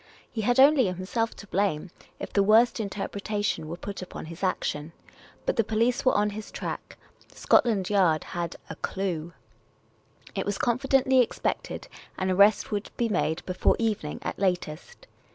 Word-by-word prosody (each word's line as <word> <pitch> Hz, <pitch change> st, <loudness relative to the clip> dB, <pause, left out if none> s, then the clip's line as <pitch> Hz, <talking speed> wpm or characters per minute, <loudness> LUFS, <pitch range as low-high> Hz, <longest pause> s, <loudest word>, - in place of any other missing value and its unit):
He 225 Hz, -, -3 dB
had 245 Hz, +4 st, +2 dB
only 275 Hz, -4 st, +7 dB
himself 185 Hz, +6 st, -2 dB
to -, -, -11 dB
blame 190 Hz, -4 st, -1 dB, 0.3 s
if -, -, -7 dB
the 200 Hz, -, +4 dB
worst 220 Hz, +5 st, +5 dB
interpretation 205 Hz, -2 st, -2 dB
were 170 Hz, +2 st, -5 dB
put 200 Hz, +1 st, -6 dB
upon 185 Hz, -, -7 dB
his 165 Hz, +2 st, -10 dB
action. 160 Hz, -4 st, -1 dB, 0.5 s
But -, -, 0 dB
the 225 Hz, -, +4 dB
police 230 Hz, +5 st, +1 dB
were 255 Hz, -, +3 dB
on 210 Hz, 0 st, +2 dB
his 210 Hz, +1 st, -7 dB
track; -, -, -6 dB, 0.3 s
Scotland 205 Hz, -6 st, +2 dB
Yard 180 Hz, -6 st, +3 dB
had 170 Hz, -1 st, -4 dB
" -, -, -28 dB
a -, -, -6 dB
clue 175 Hz, -4 st, -3 dB, 0.5 s
", -, -, -25 dB
it -, -, 0 dB
was 205 Hz, 0 st, -2 dB
confidently 260 Hz, +1 st, +3 dB
expected 240 Hz, -, -2 dB, 0.3 s
an 185 Hz, 0 st, 0 dB
arrest 200 Hz, +4 st, +4 dB
would 205 Hz, 0 st, -2 dB
be 235 Hz, -1 st, +1 dB
made 175 Hz, -5 st, 0 dB
before 185 Hz, 0 st, +2 dB
evening 210 Hz, -10 st, -1 dB
at -, -, -4 dB
latest. 180 Hz, -, -2 dB
205 Hz, 165 wpm, -27 LUFS, 180-230 Hz, 0.5 s, only